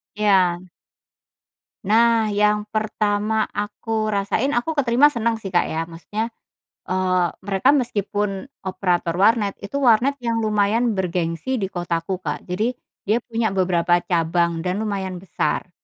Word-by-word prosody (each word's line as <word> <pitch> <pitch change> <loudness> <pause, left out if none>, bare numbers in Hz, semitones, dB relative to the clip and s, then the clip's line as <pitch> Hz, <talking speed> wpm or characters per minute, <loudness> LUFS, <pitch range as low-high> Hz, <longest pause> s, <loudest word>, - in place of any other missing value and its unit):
Iya. 190 -4 +2 1.2
Nah 225 +1 +3
yang 210 0 +2
pertama 215 0 0
aku 215 +1 -3
rasain 215 +6 0
aku 240 +7 0
keterima 285 0 +4
senang 230 -2 0
sih 205 -4 -7
Kak 175 - +2
ya. 160 +1 -2
Maksudnya, 205 +8 -5 0.6
eee, 185 -1 +2 0.2
mereka 195 +5 +2
meskipun 210 -5 0 0.2
operator 180 -2 0
warnet 210 -1 +3
itu 200 +8 -4
warnet 265 +1 +3
yang 230 -2 -1
lumayan 215 +1 +1
bergengsi 180 +6 -2
di 195 - -1
kotaku 175 0 -2
Kak, 185 - -4
jadi 220 +7 0 0.3
dia 215 +3 +2
punya 225 -1 -1
beberapa 175 -2 +2
cabang 170 -1 +1
dan 185 +4 -1
lumayan 190 -4 -3
besar, 170 -2 -2
205 Hz, 130 wpm, -22 LUFS, 185-225 Hz, 1.2 s, keterima